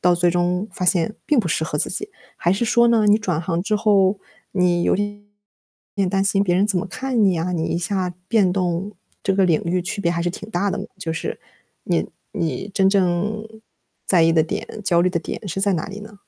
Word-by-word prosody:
到 180 0 +4
最 175 0 +2
终 180 +3 0
发 185 - -3
现 180 +3 +2
并 295 -4 +3
不 185 - -4
适 160 - 0
合 150 - -3
自 - - +2
己？ 410 - -2 0.3
还 175 - +1
是 210 +5 0
说 235 +1 +4
呢， 225 -3 +3
你 205 +1 +6
转 180 -6 -1
行 170 -1 -1
之 215 +1 0
后， 200 -2 +3 0.3
你 180 -2 +2
有 - - +3
点 205 +1 -4 0.8
担 195 +1 +1
心 195 0 +3
别 175 -2 +1
人 195 +3 +3
怎 195 -4 +1
么 195 - -3
看 250 +2 0
你 185 -3 +3
啊， 170 +3 -1
你 160 -2 -1
一 170 - -1
下 180 0 -1 0.2
变 205 -6 +3
动 185 +2 -1 0.3
这 195 - +2
个 195 - +3
领 165 -4 +3
域， 175 +1 0
区 190 +3 -3
别 170 - +1
还 170 0 -1
是 175 - 0
挺 210 +4 -9
大 200 +1 0
的 205 - -3
嘛。 195 - -4
就 165 -4 -3
是 165 - -4 0.4
你 - - 0 0.2
你 165 +4 -3
真 190 -1 +3
正 195 +3 +1 0.6
在 175 -3 +4
意 165 0 +4
的 160 - +4
点、 160 - -4 0.2
焦 170 -4 +3
虑 180 +1 +2
的 170 - 0
点 205 - -6
是 190 +4 -3
在 200 0 +3
哪 165 -4 -2
里 200 +1 -8
呢？ 210 -1 -12
190 Hz, 250 characters per minute, -21 LUFS, 175-205 Hz, 0.8 s, 你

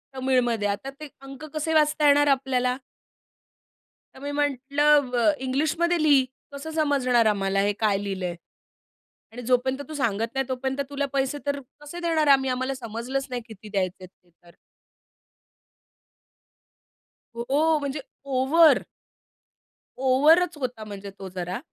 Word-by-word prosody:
तमिळमध्ये. 250 -5 +1
आता 205 +7 -3
ते 305 - -7
अंक 275 +1 -10
कसे 315 +1 -1
वाचता 300 -1 +3
येणार 290 0 +5
आपल्याला? 260 -2 +1 1.4
तर - - -12
मी 285 +1 -4
म्हटलं, 285 0 +2
अ, 245 +5 +3
"इंग्लिशमध्ये 315 +6 +1
लिही 285 -4 +5 0.3
कसं 280 +3 -7
समजणार 275 -7 +2
आम्हाला 195 -2 +1
हे 205 +1 +2
काय 210 -3 +2
लिहिलंय 185 -3 -3 1.0
आणि 245 - -7
जोपर्यंत 255 +3 0
तू - - -6
सांगत 230 -5 -1
नाही, 270 0 0
तोपर्यंत 265 +1 -2
तुला 285 0 -2
पैसे 270 +1 0
तर 285 0 -1 0.2
कसे 295 +4 -8
देणार 325 -3 +1
आहे 280 - +8
आम्ही? 265 0 -2
आम्हाला 260 +1 -1
समजलंच 245 +3 -4
नाही 250 -1 -3
किती 215 -1 -12
द्यायचेत 185 -2 -3 0.2
ते 175 - -30
तर." 170 0 -22 2.8
हो, 290 +7 +1
म्हणजे 285 0 -3 0.3
ओव्हर. 280 +5 +4 1.2
ओव्हरच 310 +7 +4
होता 250 -5 -4
म्हणजे 200 -1 -8
तो 195 -1 -7
जरा 180 +3 -3
265 Hz, 135 wpm, -25 LUFS, 230-290 Hz, 2.8 s, आहे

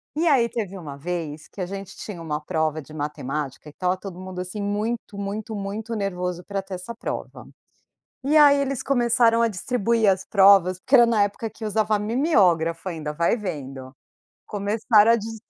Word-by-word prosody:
E 330 +3 +1
aí 260 -7 +4
teve 200 -4 -4
uma 150 -6 -8
vez 160 -1 -5
que - - -15
a - - -1
gente 195 +1 -7
tinha 185 -6 -7
uma 150 -2 -3
prova 155 -1 -1
de 150 +2 -14
matemática 145 -1 -4
e 150 - -9
estava 180 +4 -1
todo 185 -1 -9
mundo, 185 -1 -6
assim, 185 +3 -6
muito, 210 +1 -3
muito, 210 +2 -4
muito 210 +3 -4
nervoso 180 -3 -3
pra 200 0 -3
ter 195 0 -10
essa 180 +6 -7
prova, 230 - -6 0.8
e 295 +3 +3
aí 290 -1 +7
eles 275 -2 -1
começaram 235 -3 +3
a 230 - +4
distribuir 225 +1 +1
as 190 0 +1
provas, 195 -2 +5
porque 260 +8 +2
era 240 -2 +8
na 225 -3 +3
época 205 +2 -3
que 220 +1 -9
usava 215 0 +1
mimiógrafo 195 - +2
ainda, 155 -4 -4
vai 170 +8 +2
vendo. 135 - -6 0.5
Começaram 210 +2 +3
a - - +5
distribuir, 225 0 -7
200 Hz, 180 wpm, -24 LUFS, 175-225 Hz, 0.8 s, era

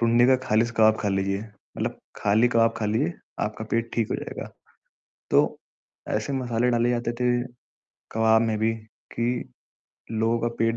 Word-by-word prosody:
टुंडी 120 +1 +4
का 130 - +5
खाली 110 +2 +4
स 120 - -7
कबाब 110 0 +5
खा 105 - +1
लीजिए, 95 0 0 0.4
मतलब - - -2 0.2
खाली 110 +4 +3
कबाब 115 -1 +3
खा 110 - -1
लीजिए, 125 +11 +1 0.3
आपका 105 +1 -3
पेट 115 0 0
ठीक 115 -2 0
हो - - 0
जाएगा। - - -6 0.8
तो - - +3 0.6
ऐसे 110 +6 -2
मसाले 125 -2 0
डाले 120 0 +2
जाते 120 -1 -1
थे 125 0 +3 0.8
कबाब 110 0 +4
में 110 -1 0
भी 110 +1 +1 0.4
कि 120 +1 -1 0.7
लोगों 115 +1 +1
का 120 - +1
पेट 115 0 +2
115 Hz, 165 wpm, -25 LUFS, 110-120 Hz, 0.8 s, का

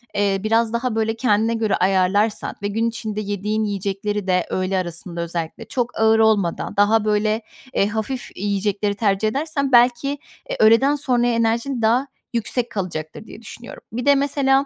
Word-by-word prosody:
eee, 200 -1 +1
biraz 225 +1 +1
daha, 235 -1 -1
böyle, 225 0 0
kendine 225 -1 +1
göre 225 -2 0
ayarlarsan 195 +3 +1
ve 205 - -1
gün 225 +3 0
içinde 220 -2 -4
yediğin 210 +2 -2
yiyecekleri 200 0 -3
de 180 -2 +2
öğle 185 +1 -1
arasında 175 -1 -4
özellikle 170 -1 -5
çok 245 -3 -3
ağır 220 0 +4
olmadan, 210 -6 +1
daha, 210 +2 +3
böyle, 215 +1 +1 0.3
eee, 200 - +2
hafif 220 +4 -4
yiyecekleri 205 +1 -1
tercih 200 0 +1
edersen 280 +3 -1
belki, 245 +2 +4 0.4
eee, - - -2
öğleden 230 +7 +5
sonraya 245 -4 +1
enerjin 230 +2 0
daha 240 +5 +2 0.3
yüksek 235 +1 -1
kalacaktır 175 -2 -5
diye 225 - -12
düşünüyorum. 235 +2 -11
Bir 245 +1 -3
de 285 0 +6
mesela 275 -1 +2
220 Hz, 160 wpm, -21 LUFS, 200-235 Hz, 0.4 s, de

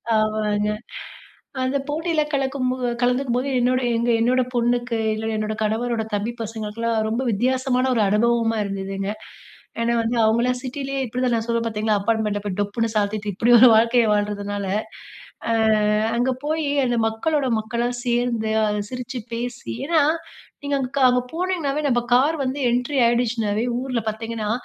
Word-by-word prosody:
ஆமாங்க, 215 -1 +1 0.9
அந்த 260 +2 0
போட்டியில 320 +1 0
கலக்கும் 270 -2 0
போ 255 - -3 0.2
கலந்துக்கும் 250 0 +1
போது, 255 +2 -1
என்னோட 255 +1 +2 0.2
எங்க 235 +1 0
என்னோட 255 +2 +3
பொண்ணுக்கு 240 0 +1 0.2
இல்ல, 220 +1 -4
என்னோட 215 0 -2
கணவரோட 225 +1 -1
தம்பி 205 +3 -2
பசங்களுக்கெல்லாம் 225 +1 -2
ரொம்ப 230 +4 -1
வித்தியாசமான 255 +3 +1
ஒரு 220 - +3
அனுபவமா 225 +2 +2
இருந்ததுங்க. 195 0 -3 0.7
ஏன்னா 235 +1 +1
வந்து 230 +1 -1
அவங்களாம் 240 +3 +2
சிட்டிலேயே 275 +1 -4
இப்டி 245 +1 -5
தான் 245 - +1
நான் 225 - -1
சொல்லுவேன் 230 0 0
பார்த்தீங்களா, 215 -1 0
அப்பார்ட்மெண்ட்ட 210 -1 0
போய் 195 -3 -3
டொப்புன்னு 225 +3 -1
சாத்திட்டு 205 0 -1
இப்டி 230 +6 +3
ஒரு 255 +1 +9
வாழ்க்கையை 230 +1 +4
வாழறதுனால, 205 -1 -2 0.8
அ - - +2 0.6
அங்க 245 +2 +1
போய் 310 +1 0 0.2
அந்த 245 -1 0
மக்களோட 275 +6 0
மக்களா 235 +2 -2 0.2
சேர்ந்து, 240 -2 0
அ - - +3 0.2
சிரிச்சு 250 0 -5
பேசி 240 - -4 0.2
ஏன்னா, 325 -1 +4 0.6
நீங்க 285 0 -1
அங்க 255 -2 -2
க - - +3
அங்க 250 0 +2
போனிங்கனாவே, 330 -5 -1
நம்ம 240 -3 +2
கார் 275 +6 +4
வந்து 265 +2 -2
என்ட்ரி 250 +4 0
ஆயிடுச்சுனாவே, 230 -3 +1 0.2
ஊருல 250 -2 -2
பார்த்தீங்கன்னா 220 0 -4
235 Hz, 150 wpm, -22 LUFS, 215-255 Hz, 0.9 s, ஒரு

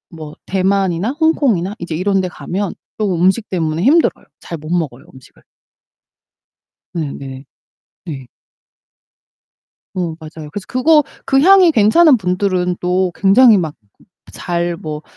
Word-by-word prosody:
뭐 155 -1 -9
대만이나 190 +1 0
홍콩이나 240 - +1
이제 170 -2 -5
이런데 190 +1 0
가면 190 +2 -5 0.2
쪼금 190 -5 -1
음식 195 +4 +1
때문에 165 -2 -2
힘들어요. 305 - +2 0.2
잘 165 -3 -7
못 155 - -10
먹어요, 155 -6 -3
음식을. 130 -1 -18 1.6
네 150 -4 -3
네. 135 0 -9 0.6
네. 135 -7 -7 1.7
어, 175 -3 -3
맞아요. 155 -1 -10
그래서 200 +4 -7
그거 300 +4 +3 0.2
그 270 0 +3
향이 370 +1 +6
괜찮은 270 +5 +5
분들은 180 -2 -1
또 180 0 0
굉장히 215 +3 +5
막 160 -4 -3 0.6
잘 175 -1 -3
뭐 155 -2 -6
185 Hz, 250 characters per minute, -16 LUFS, 165-210 Hz, 1.7 s, 향이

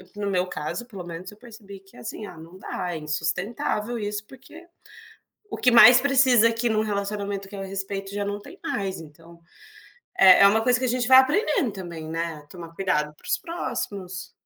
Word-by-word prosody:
no 205 -1 -3
meu 180 0 0
caso 180 +8 -5
pelo 195 -7 -9
menos 175 +2 -8
eu 210 - -13
percebi 215 -4 -13
que, 195 -7 -20
assim, 125 - -7
ah 175 - -11
não 165 +3 -13
dá, 180 -2 -5
é - - -4
insustentável 195 +9 -3
isso 205 0 -4
porque 270 +8 -15 0.8
o 415 - -6
que 250 - +3
mais 240 +2 +9
precisa 255 -4 +4
aqui 230 +1 -1
em 220 - 0
um 215 - +2
relacionamento 200 -1 -3
que 200 - -11
é 195 - -5
respeito 195 0 -5
já 205 0 -2
não 205 0 -4
tem - - -14
mais 195 -3 -3
então, 165 +2 -15 0.8
é 185 -1 +8
é 200 - +9
uma 220 +3 +3
coisa 250 0 +2
que 255 - -1
a - - 0
gente 245 0 -1
vai 260 - +9
aprendendo 280 - +3
também, 170 -5 -8
né, 165 -2 -4
tomar 170 -2 -11
cuidado 150 -6 -1
para - - -22
os - - +1
próximos. 205 - -6
200 Hz, 200 wpm, -24 LUFS, 180-235 Hz, 0.8 s, mais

